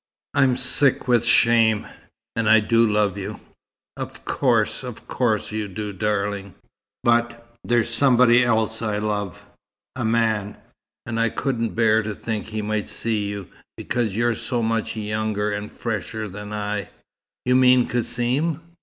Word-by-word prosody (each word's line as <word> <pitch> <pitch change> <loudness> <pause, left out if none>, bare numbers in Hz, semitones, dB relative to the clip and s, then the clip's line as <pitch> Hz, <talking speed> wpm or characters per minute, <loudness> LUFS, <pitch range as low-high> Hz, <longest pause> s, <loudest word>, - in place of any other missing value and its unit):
I'm 135 -3 +3
sick 140 -1 +4
with 120 -2 +3
shame. 115 -2 +4 0.5
And 115 -2 +1
I 110 0 +7
do 115 +1 +2
love 105 -2 +1
you!" 95 - -6 0.6
"Of - - -8
course 115 -5 +1
of 125 -4 -9
course 110 -5 0
you 110 -1 -3
do, 105 +2 -5
darling." 100 -1 -2 0.5
"But 120 0 0
there's 120 -1 +1
somebody 125 -1 +5
else 110 -2 0
I 105 -2 -1
love. 105 -1 -3 0.5
A 125 - -3
man. 110 -2 0 0.5
And 115 0 -3
I 115 0 +2
couldn't 115 -3 -2
bear 110 -1 +3
to 105 -1 -5
think 110 -3 -4
he 110 -1 -4
might 105 0 -2
see 110 -3 -2
you, 100 -2 -6 0.3
because 115 -5 -2
you're 120 +1 +2
so 120 +1 -2
much 115 0 -1
younger 105 -1 -2
and 105 0 -5
fresher 110 -1 -4
than 105 +2 -8
I." 105 -2 -3 0.6
"You 125 0 +3
mean 125 -1 +5
Cassim?" 125 +6 0
110 Hz, 145 wpm, -22 LUFS, 105-120 Hz, 0.6 s, I